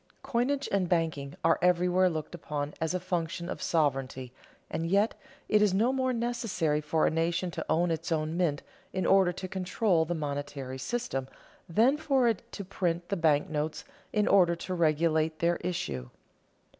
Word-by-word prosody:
Coinage 270 +4 0
and 190 -3 +1
banking 160 -5 -1
are 165 0 +3
everywhere 180 +1 +3
looked 155 -2 -5
upon 150 -3 -4
as 160 +2 0
a - - 0
function 175 -1 -3
of - - -5
sovereignty, 135 -5 -1 0.3
and 165 - -3
yet 200 +5 +3 0.3
it 210 - +4
is 205 -3 +3
no 235 +6 +3
more 260 -1 +1
necessary 230 -11 -1
for 155 +1 +1
a - - +2
nation 170 +2 0
to - - -4
own 170 +2 +2
its 165 +1 -3
own 155 0 0
mint 165 -5 0 0.3
in 185 - -1
order 190 -2 +5
to 185 +2 -6
control 185 -1 +1
the 175 +2 -2
monetary 145 -3 -4
system 135 - -3 0.4
than 230 - +4
for 275 -5 +2
it 225 -4 +1
to 200 - -6
print 175 -2 -2
the 200 - 0
bank 160 -2 +2
notes 155 -1 -3 0.3
in 210 -1 +1
order 180 -3 +5
to 185 +2 -5
regulate 160 -1 +2
their 170 +1 +1
issue. 70 - -4
170 Hz, 170 wpm, -29 LUFS, 155-190 Hz, 0.4 s, order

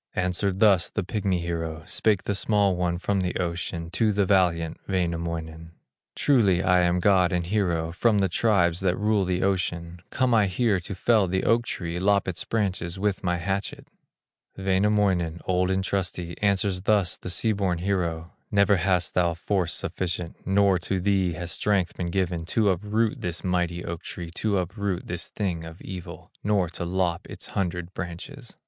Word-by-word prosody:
Answered 95 +1 0
thus 100 -6 +5
the - - -2
pigmy 95 -2 -1
hero, 80 -2 -4
Spake 105 -4 +1
the 100 - -1
small 100 -1 +2
one 90 -1 0
from 100 +2 0
the 90 -1 -1
ocean 85 -1 -3
To 105 +3 +2
the 100 -1 +2
valiant 85 -4 +2
Wainamoinen: 85 -3 -3 0.4
"Truly 100 -10 +3
am 90 -1 +3
I - - +1
god 90 -1 +4
and 90 -1 0
hero, 85 -4 0
From 105 +5 +2
the 100 -1 +3
tribes 90 -3 +2
that 90 -2 +1
rule 105 -2 +2
the 90 0 0
ocean; 85 -3 -1
Come 130 -2 +1
I 105 -3 +4
here 100 +1 +1
to 90 +3 -6
fell 105 0 +3
the 95 +1 -1
oak 120 +1 +3
tree, 85 -1 -3
Lop 100 +1 +2
its 90 -2 -2
branches 95 -5 -1
with 100 0 -1
my 90 -1 +1
hatchet." 95 +3 -3 0.7
Wainamoinen, 95 -3 +1
old 90 0 +1
and 95 0 +1
trusty, 90 -3 -3
Answers 100 -2 +1
thus 100 -2 +2
the - - -8
sea 100 +5 0
born 95 -4 0
hero: 85 -3 -2 0.2
"Never 100 0 +4
hast 90 0 +1
thou 85 -2 +2
force 90 0 -1
sufficient, 85 -2 -3
Not 95 -1 +3
to 95 +2 -1
thee 95 -2 +1
has 85 +1 -5
strength 95 -3 0
been 85 -1 -3
given, 85 -2 -1
To 105 +3 +2
uproot 105 +4 0
this 85 -1 -3
mighty 90 -1 -1
oak 85 -1 -5
tree, 85 -2 -7
To 100 +3 0
upset 95 0 -2
this 85 0 -3
thing 90 -6 -3
of 80 +1 -10
evil, 90 -2 -9
Nor 100 -4 +1
to 85 - -5
lop 90 -1 -1
its - - -7
hundred 90 -2 -2
branches." 105 +9 -7
90 Hz, 175 wpm, -26 LUFS, 85-100 Hz, 0.7 s, thus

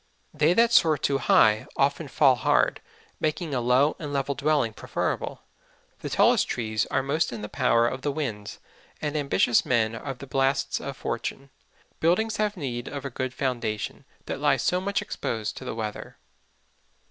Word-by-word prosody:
They 155 +3 +3
that 230 +4 +4
soar 160 -8 +5
too 135 +1 0
high, 110 -3 +4
often 140 +3 +1
fall 135 0 +4
hard, 120 - +1 0.4
making 155 0 -2
a 125 - 0
low 130 +5 +3
and 150 -3 -5
level 140 0 -1
Dwelling 145 -4 +1
preferable. - - -3 0.6
The - - -5
tallest - - +3
Trees 110 -3 -1
are 135 - 0
most 155 +4 0
in 115 -3 -6
the - - -4
Power 115 +2 +2
of 130 +2 -4
the 145 - -1
Winds, 115 -9 -4 0.4
and 150 0 -3
Ambitious 140 -5 +2
Men 115 -3 +1
of 135 +3 -6
the 140 - -9
Blasts 135 +1 0
of - - -6
Fortune. 135 0 -4 0.5
Buildings 220 +7 +1
have 210 -1 -1
need 125 -6 -4
of 140 -1 -6
a 135 - -4
good 130 +1 -3
Foundation, 120 -5 -3 0.2
that - - -4
lie - - +3
so 180 0 0
much 200 +1 -1
exposed 110 -2 -4
to - - -8
the - - -4
Weather. 110 -2 -6
135 Hz, 170 wpm, -26 LUFS, 120-155 Hz, 0.6 s, soar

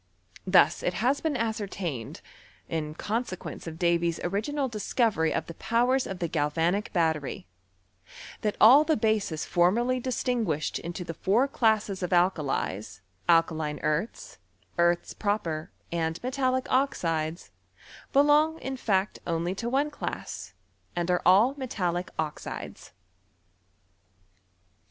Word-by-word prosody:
Thus 185 -1 +5
it 180 - -1
has 260 +7 +1
been 310 -4 0
ascertained, 200 - -3 0.5
in 155 -1 -3
consequence 210 -3 -4
of 160 -1 -6
Davy's 170 -1 +1
original 230 +10 -1
discovery 215 -6 0
of - - -1
the 165 - -8
powers 245 +8 +1
of 190 - -5
the 175 -2 -2
galvanic 165 +6 0
battery, 160 - -1 1.0
that 210 -1 -1
all 260 +7 +8
the 315 0 +1
bases 215 -8 0
formerly 235 +9 +2
distinguished 235 - -1
into 175 +2 -5
the 165 -1 -5
four 215 - +2
classes 220 -7 +1
of 180 - -2
alka 180 -1 +3
lies, 105 -8 -3 0.3
alkaline 160 -3 +2
earths, 160 +9 -2 0.4
earths 175 0 +2
proper, 175 -7 -2 0.2
and 165 -1 -1
metallic 260 0 0
oxides, 165 - 0 0.6
belong 295 +3 +4
in 265 -4 -5
fact 200 -4 0
only 170 +1 -1
to 230 +5 -3
one 280 +4 +1
class, - - -6 0.4
and 175 0 0
are 180 - +2
all 205 +9 +6
metallic 180 -9 -2
oxides. 155 -2 -5
190 Hz, 120 wpm, -27 LUFS, 165-240 Hz, 1.0 s, all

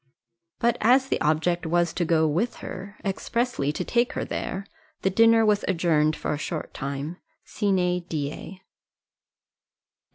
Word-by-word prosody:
But 235 0 +1
as 255 +4 +4
the - - 0
object 160 +3 +1
was 170 0 +1
to 175 - 0
go 160 -1 +3
with 175 +11 0
her 200 +2 -8
expressly 200 - -1
to 180 - -3
take 240 0 +1
her - - -2
there 195 +2 -4 0.4
the 190 - +2
dinner 225 +2 +5
was 210 -1 +2
adjourned 160 -4 +2
for - - -2
a 145 - -3
short 155 0 -4
time 140 +5 -4 0.3
sine 180 -4 0
die. 155 +5 -5
180 Hz, 140 wpm, -25 LUFS, 155-210 Hz, 0.4 s, dinner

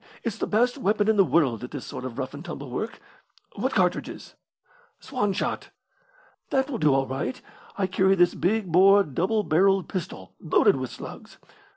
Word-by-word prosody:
It's 225 -2 -4
the - - -1
best 245 +5 +1
weapon 210 -2 +1
in 220 - +4
the 200 - +6
world 140 - +1
at 125 - -6
this 145 -4 -7
sort 125 - -7
of 125 -3 -7
rough 130 0 -4
and 145 +2 -8
tumble 145 -6 -7
work. 220 - -4 0.6
What - - -2
cartridges?" - - -1 0.7
"Swan 205 -7 -2
shot." 190 - -3 0.8
"That 270 +1 0
will 240 - -3
do 150 -4 +3
all 135 0 +1
right. 130 -1 -4 0.4
I 195 - +1
carry 190 +1 +2
this 175 -1 +3
big 195 0 -1
bore 195 +4 +6
double 190 - -1
barrelled 195 +2 +2
pistol 170 - -6
loaded 160 - +3
with 130 -2 -4
slugs. - - -10
185 Hz, 180 wpm, -25 LUFS, 140-205 Hz, 0.8 s, the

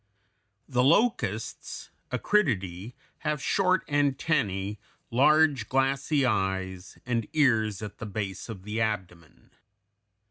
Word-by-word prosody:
] 105 +1 -48
The 125 - +5
locusts 215 - 0 0.2
(Acridiidæ) 105 - 0 0.3
have 150 -1 -1
short 185 +4 +1
antennæ, 135 - 0 0.3
large 140 -1 +4
glassy 135 +2 +1
eyes, 95 -4 -2
and 115 -3 -1
ears 110 -9 +2
at 105 - -8
the 115 - -5
base 100 0 -5
of 95 -5 -7
the 105 +2 -3
abdomen. 95 -7 -4
115 Hz, 105 wpm, -27 LUFS, 100-145 Hz, 0.3 s, The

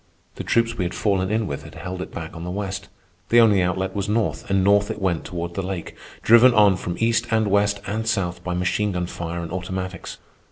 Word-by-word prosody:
The - - -4
troops 115 0 +1
we - - +1
had 85 - -4
fallen 95 -3 0
in 110 +1 0
with 70 -7 -4
had - - -12
held 90 0 -6
it - - -7
back 80 0 -7
on 80 - -7
the 90 - -5
west. 95 0 -4 0.4
The 120 - +6
only 105 -5 +5
outlet 95 +1 -1
was 100 0 -2
north, 110 0 -1
and 95 -1 +2
north 100 +1 +4
it - - -4
went 90 -4 -1
toward 85 -1 -5
the 95 - -2
lake, 95 -2 -5 0.3
driven 120 +2 +7
on 105 -3 +6
from 90 -1 -4
east 115 +1 +1
and 110 -1 +2
west 100 +1 +2
and 110 +3 -3
south 95 -5 -1
by 90 -1 -2
machine 95 +3 0
gun 90 0 -1
fire 85 0 -5
and 85 - -6
automatics. 95 0 -5
95 Hz, 230 wpm, -23 LUFS, 90-105 Hz, 0.4 s, driven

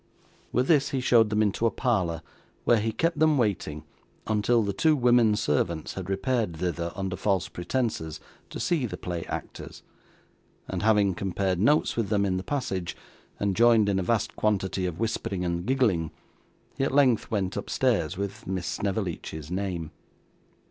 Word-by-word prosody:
With 125 +2 +1
this 140 -4 +4
he 135 - -1
showed 115 -3 +4
them 105 0 +2
into 110 +3 +1
a - - +3
parlour 95 - -1 0.4
where 120 - +4
he 110 +1 -1
kept 165 +9 0
them 155 -1 +4
waiting, 95 - -1 0.4
until 110 +2 +2
the 100 -1 -1
two 155 +10 +3
women 120 -4 +4
servants 80 -2 -1
had 95 -1 -6
repaired 105 -3 -1
thither, 85 0 -2
under 95 -2 -3
false 95 -3 0
pretences, 90 -5 -3 0.3
to - - -7
see 155 -8 0
the 90 -4 -6
play 85 -1 -4
actors; - - -7 0.8
and 95 - -3
having 105 -3 +3
compared 95 0 -1
notes 145 +10 +3
with 115 -4 -1
them 100 -1 +2
in 95 -1 0
the 95 - -4
passage, 95 -11 -3 0.4
and 100 -2 0
joined 115 -1 +5
in 95 -1 +1
a - - 0
vast 110 +4 0
quantity 95 -3 0
of 85 -1 -5
whispering 100 -5 -2
and 85 +2 -2
giggling, 110 - +2 0.7
he - - +2
at 135 - 0
length 130 -6 +3
went 100 -4 -1
upstairs 100 - 0
with 100 0 -5
Miss 95 -1 -2
Snevellicci's 90 -6 -3
name. 90 -4 -3
100 Hz, 165 wpm, -27 LUFS, 90-120 Hz, 0.8 s, joined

